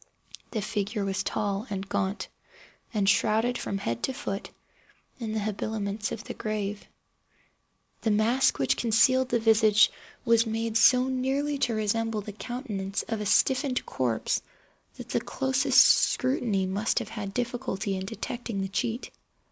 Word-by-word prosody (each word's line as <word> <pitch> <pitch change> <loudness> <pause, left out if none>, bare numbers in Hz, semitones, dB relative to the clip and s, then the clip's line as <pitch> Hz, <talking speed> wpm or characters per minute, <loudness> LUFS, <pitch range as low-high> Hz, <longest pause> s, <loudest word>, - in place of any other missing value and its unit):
The 215 -3 -3
figure 210 0 -2
was 190 -1 -1
tall 205 +3 -2
and 195 -1 -4
gaunt, 195 +1 -2 0.6
and 205 -5 0
shrouded 220 +4 +3
from 200 - -3
head 115 -10 -3
to 265 - -1
foot 195 -5 -5 0.7
in 220 -3 -4
the 220 - 0
habiliments 210 0 -3
of 215 - -5
the - - -6
grave. 210 -2 -4 1.1
The 225 - 0
mask 220 +5 +3
which 135 - +1
concealed 255 +3 +3
the 240 - +2
visage 220 -1 +5 0.3
was 230 -1 +4
made 225 0 -2
so 250 +2 +5
nearly 270 +3 -1
to 245 -4 +1
resemble 220 +1 0
the 210 - -7
countenance 200 -2 -4
of 225 -2 -2
a 210 - -2
stiffened 265 +4 +2
corpse 120 -4 -1 0.5
that - - -10
the - - 0
closest 265 -1 +2
scrutiny 245 -7 +2
must 200 +4 -1
have - - -1
had 210 -3 -5
difficulty 215 -4 -2
in 190 0 -4
detecting 230 -1 -4
the 195 - -3
cheat. 230 +5 -2
220 Hz, 150 wpm, -27 LUFS, 200-240 Hz, 1.1 s, visage